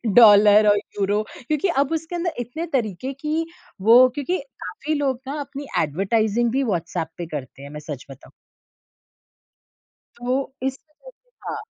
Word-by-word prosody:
Dollar 210 -2 +8
और 205 - +5
euro 205 +1 -1 0.3
क्योंकि 305 +5 +1 0.2
अब 285 - -9
उसके 325 +2 -8
अंदर 345 -1 -1
इतने 245 +8 -4
तरीके 235 +4 -3
की 305 +4 -2 0.4
वो 250 +2 +9
क्योंकि 320 +6 -1 0.3
काफ़ी 295 +12 -4
लोग 265 -3 -1
ना 290 +2 -3
अपनी 280 0 -7
एडवरटाइजिंग 215 +8 +1
भी 270 +2 +1
व्हाट्सएप 170 -6 -2
पे 175 - -4
करते 135 -1 -7
हैं 140 - -9
मैं 150 0 -7
सच 140 -4 -6
बताऊँ। 135 - -13 1.8
तो 255 +3 -2 0.2
इस 270 0 -3 0.7
हाँ। 430 - -4
240 Hz, 145 wpm, -22 LUFS, 200-285 Hz, 1.8 s, वो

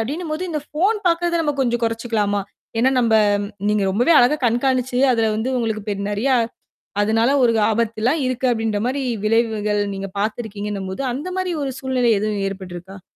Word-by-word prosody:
அப்டின்னும்போது 310 +7 -3
இந்த 305 -2 -2
ஃபோன் 385 +8 +1
பாகறத 340 0 +2
நம்ம 295 -2 0
கொஞ்சம் 240 -1 0
கொறைச்சுக்கலாமா? 225 -3 -1 0.4
ஏன்னா 260 +2 +4
நம்ப 230 -2 +2 0.3
ம் - - -6 0.2
நீங்க 210 -1 +1
ரொம்பவே 245 - +3
அழகா 295 +5 +3
கண்காணிச்சுது, 255 +2 +1
அத 230 - +1 0.2
வந்து 230 +4 -1
உங்களுக்கு 220 -3 -2
பெ - - 0 0.2
நெறையா 250 +6 +1 0.7
அதனால 225 +4 +2
ஒரு 235 -2 +4 0.2
ஆபத்துலாம் 230 +6 0
இருக்கு 255 0 -1
அப்டின்ற 225 -3 0
மாரி 270 +2 -1 0.2
விளைவுகள் 215 -2 +1
நீங்க 195 0 -5
பாத்துருக்கீங்கன்னும்போது, 205 -1 -3
அந்த 295 +8 -5
மாரி 370 -1 -1
ஒரு 270 -1 -2
சூழ்நிலை 255 -3 +1
எதுவும் 210 -2 -1
ஏற்பட்டுருக்கா? 190 0 -9
230 Hz, 155 wpm, -21 LUFS, 210-265 Hz, 0.7 s, ஏன்னா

